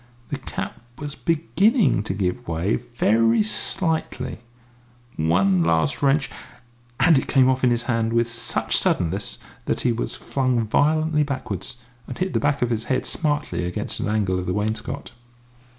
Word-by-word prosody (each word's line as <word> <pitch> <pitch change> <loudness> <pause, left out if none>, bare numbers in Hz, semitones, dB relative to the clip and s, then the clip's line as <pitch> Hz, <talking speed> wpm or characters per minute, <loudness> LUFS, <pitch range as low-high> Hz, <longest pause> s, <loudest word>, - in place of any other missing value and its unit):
The 140 - -3
cap 135 - -6 0.2
was 145 -1 -5
beginning 185 - +2
to 95 - -2
give 105 +5 -2
way, 85 +5 0 0.2
very 115 0 +4
slightly; 130 - -2 0.8
one 90 +3 +3
last 80 - +1
wrench 140 +2 +3 0.7
and 165 -6 +6
it - - -5
came 130 -2 +4
off 130 0 +1
in 125 - +5
his 120 -1 +1
hand 115 -1 0
with 115 0 +2
such 115 0 -2
suddenness 95 +4 0 0.3
that - - -1
he 125 - +2
was 115 - -3
flung 130 -4 0
violently 155 +6 +2
backwards, 130 - -3 0.3
and 125 - -6
hit 185 0 -1
the - - +2
back 145 -2 +1
of 120 - 0
his 110 -1 -1
head 130 -1 0
smartly 145 - -1
against 90 0 -3
an - - -1
angle 100 -4 +1
of 90 - -5
the 90 - 0
wainscot. 110 +6 -3
120 Hz, 160 wpm, -23 LUFS, 105-145 Hz, 0.8 s, and